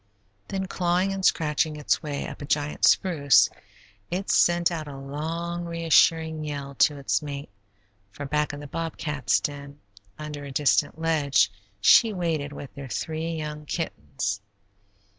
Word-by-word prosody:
Then 190 Hz, -1 st, -2 dB
clawing 180 Hz, +1 st, 0 dB
and 195 Hz, 0 st, -4 dB
scratching 155 Hz, -2 st, +2 dB
its 150 Hz, -1 st, 0 dB
way 145 Hz, -3 st, -4 dB
up -, -, -9 dB
a -, -, -4 dB
giant 145 Hz, +1 st, 0 dB
spruce, 145 Hz, -8 st, +4 dB, 0.6 s
it 190 Hz, +3 st, -2 dB
sent 175 Hz, 0 st, +4 dB
out 160 Hz, -3 st, -4 dB
a 140 Hz, -1 st, -8 dB
long, 165 Hz, +5 st, -4 dB
reassuring 165 Hz, -1 st, +3 dB
yell 140 Hz, -2 st, -5 dB
to 150 Hz, -, +4 dB
its 140 Hz, +2 st, 0 dB
mate, 145 Hz, -1 st, -6 dB, 0.6 s
for 140 Hz, +8 st, -7 dB
back 150 Hz, +2 st, 0 dB
in 145 Hz, 0 st, -8 dB
the -, -, -8 dB
bobcat's 150 Hz, -3 st, -1 dB
den, 140 Hz, 0 st, -6 dB, 0.4 s
under 150 Hz, -1 st, -6 dB
a 140 Hz, -, -7 dB
distant 145 Hz, +3 st, +2 dB
ledge, 145 Hz, -11 st, +2 dB, 0.3 s
she 220 Hz, -, +6 dB
waited 160 Hz, -6 st, -2 dB
with 145 Hz, -1 st, -9 dB
their 140 Hz, -2 st, -8 dB
three 160 Hz, +5 st, -3 dB
young 150 Hz, -1 st, -6 dB
kittens. 120 Hz, -, -3 dB
150 Hz, 145 wpm, -26 LUFS, 145-165 Hz, 0.6 s, she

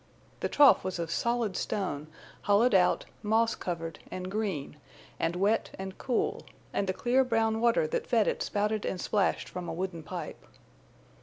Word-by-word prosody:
The -, -, -1 dB
trough 290 Hz, -2 st, +6 dB
was 185 Hz, 0 st, -3 dB
of 165 Hz, -1 st, -3 dB
solid 235 Hz, -3 st, 0 dB
stone, 155 Hz, -8 st, -2 dB, 0.3 s
hollowed 205 Hz, +4 st, +4 dB
out, 180 Hz, -2 st, +4 dB, 0.2 s
moss 225 Hz, +2 st, +2 dB
covered 165 Hz, -3 st, -5 dB
and 185 Hz, 0 st, -5 dB
green 195 Hz, -10 st, -3 dB, 0.4 s
and 165 Hz, +1 st, 0 dB
wet 200 Hz, +5 st, +1 dB
and 190 Hz, 0 st, -6 dB
cool, 250 Hz, -3 st, 0 dB, 0.3 s
and 200 Hz, -, 0 dB
the -, -, +2 dB
clear 250 Hz, +6 st, +2 dB
brown 225 Hz, -2 st, +1 dB
water 235 Hz, -8 st, +3 dB
that 155 Hz, -, -2 dB
fed 225 Hz, -3 st, +3 dB
it -, -, 0 dB
spouted 210 Hz, 0 st, 0 dB
and 185 Hz, -, -2 dB
splashed 205 Hz, +2 st, 0 dB
from 180 Hz, -1 st, -6 dB
a -, -, -3 dB
wooden 175 Hz, -1 st, -4 dB
pipe. -, -, -7 dB
200 Hz, 165 wpm, -29 LUFS, 180-225 Hz, 0.4 s, trough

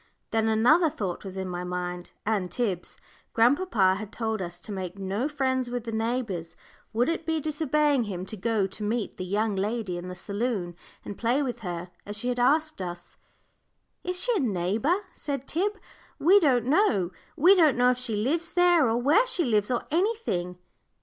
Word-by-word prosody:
Then 225 Hz, 0 st, +1 dB
another 300 Hz, +10 st, +4 dB
thought 190 Hz, -10 st, -4 dB
was 190 Hz, -1 st, -7 dB
in 190 Hz, 0 st, -3 dB
my 180 Hz, -1 st, -4 dB
mind 180 Hz, 0 st, -4 dB
and 200 Hz, -4 st, 0 dB
Tib's. 200 Hz, -7 st, -3 dB, 0.4 s
Grandpapa 235 Hz, -, +3 dB
had 215 Hz, -1 st, -7 dB
told 220 Hz, -2 st, -2 dB
us 175 Hz, -1 st, -5 dB
to 210 Hz, -, -7 dB
make 190 Hz, -1 st, -5 dB
no 195 Hz, +7 st, -2 dB
friends 260 Hz, -4 st, 0 dB
with 245 Hz, -1 st, -3 dB
the 230 Hz, -, -5 dB
neighbours. 220 Hz, -7 st, -2 dB, 0.4 s
Would 235 Hz, +3 st, +1 dB
it 330 Hz, 0 st, -1 dB
be 320 Hz, -1 st, 0 dB
disobeying 300 Hz, -3 st, +1 dB
him 185 Hz, -3 st, -5 dB
to 215 Hz, -, -5 dB
go 215 Hz, 0 st, 0 dB
to 195 Hz, +3 st, -7 dB
meet 220 Hz, +1 st, -2 dB
the -, -, -4 dB
young 205 Hz, +2 st, 0 dB
lady 200 Hz, -2 st, -2 dB
in 175 Hz, -, -7 dB
the 180 Hz, -, -6 dB
saloon 200 Hz, -2 st, -3 dB, 0.3 s
and 205 Hz, -, -7 dB
play 245 Hz, +5 st, +1 dB
with 245 Hz, -3 st, -3 dB
her, 175 Hz, -3 st, -5 dB
as 205 Hz, +1 st, -5 dB
she 245 Hz, +4 st, -2 dB
had 245 Hz, 0 st, -1 dB
asked 305 Hz, +2 st, +2 dB
us? 175 Hz, -1 st, -7 dB, 0.9 s
"Is 360 Hz, 0 st, +2 dB
she -, -, +2 dB
a -, -, +2 dB
neighbour?" 225 Hz, -, 0 dB
said 275 Hz, -2 st, -4 dB
Tib. 400 Hz, +5 st, -1 dB, 0.4 s
"We 375 Hz, +7 st, +6 dB
don't 255 Hz, -, +3 dB
know 250 Hz, -, +2 dB, 0.2 s
we 345 Hz, +5 st, +6 dB
don't 320 Hz, -9 st, +4 dB
know 250 Hz, 0 st, +5 dB
if 250 Hz, -, -2 dB
she 245 Hz, -4 st, -2 dB
lives 320 Hz, +11 st, -1 dB
there, 350 Hz, -7 st, +4 dB
or 225 Hz, -, +1 dB
where 300 Hz, -, +4 dB
she 355 Hz, -8 st, +2 dB
lives, 210 Hz, -4 st, +1 dB
or 245 Hz, -2 st, -1 dB
anything." 330 Hz, -, -1 dB
230 Hz, 190 wpm, -27 LUFS, 190-290 Hz, 0.9 s, We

